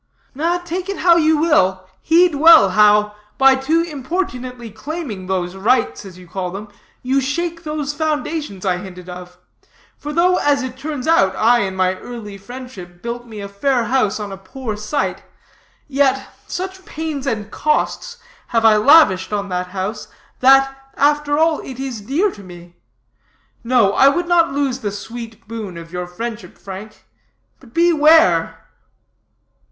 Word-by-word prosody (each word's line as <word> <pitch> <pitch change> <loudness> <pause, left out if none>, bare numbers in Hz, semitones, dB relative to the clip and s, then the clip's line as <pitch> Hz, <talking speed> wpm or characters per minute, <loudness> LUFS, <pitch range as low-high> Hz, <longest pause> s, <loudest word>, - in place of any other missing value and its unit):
"Take 360 +2 -4
it 395 - -3
how 345 -1 +5
you 315 -1 +3
will, 190 - +2
heed 340 +1 +4
well 305 - +7
how, 210 +1 +4 0.2
by 270 0 +6
too 280 +5 +1
importunately 255 - -5
claiming 220 - -6
those 185 -1 -2
rights, 230 +3 0
as 185 -2 -11
you 180 -1 -14
call 185 +1 -4
them, 200 +3 -8 0.3
you 265 +2 +1
shake 335 +5 -3
those 300 -2 -3
foundations 300 - -3
I 180 -2 +1
hinted 180 -1 -10
of. 180 0 -10 0.6
For 295 - -6
though, 360 +4 +3
as 285 -2 +1
it 255 -1 -6
turns 280 0 -5
out, 195 -13 +3
I, 240 +2 +4
in 190 -3 -2
my 185 0 +1
early 225 -4 -8
friendship, 200 -6 -11
built 240 +1 -5
me 215 -3 -8
a 200 - -6
fair 240 +5 0
house 230 -3 0
on 205 -1 -5
a 195 - -7
poor 220 +3 -6
site; 210 +7 -3 0.7
yet 270 -1 0
such 375 +1 -5
pains 305 -5 -5
and 215 -4 -3
cost 475 +10 -1 0.3
have 230 -1 +1
I 215 -1 +6
lavished 210 - +5
on 200 -1 -2
that 180 0 -2
house, 195 +3 -5 0.3
that, 270 +1 +5 0.2
after 290 0 +2
all, 320 0 +2
it 260 -1 -9
is 260 -5 -5
dear 310 - 0
to 205 - -13
me. 175 -2 -13 0.9
No, 230 -5 +3
I 270 - +5
would 345 +5 +1
not 335 -3 +3
lose 275 -2 -1
the 210 - -3
sweet 225 +2 -9
boon 215 -6 -6
of 165 +1 -11
your 180 0 -4
friendship, 230 +5 -7
Frank. 200 +2 -10 0.5
But 245 -4 -19
beware." 325 -2 +4
245 Hz, 160 wpm, -19 LUFS, 200-295 Hz, 0.9 s, well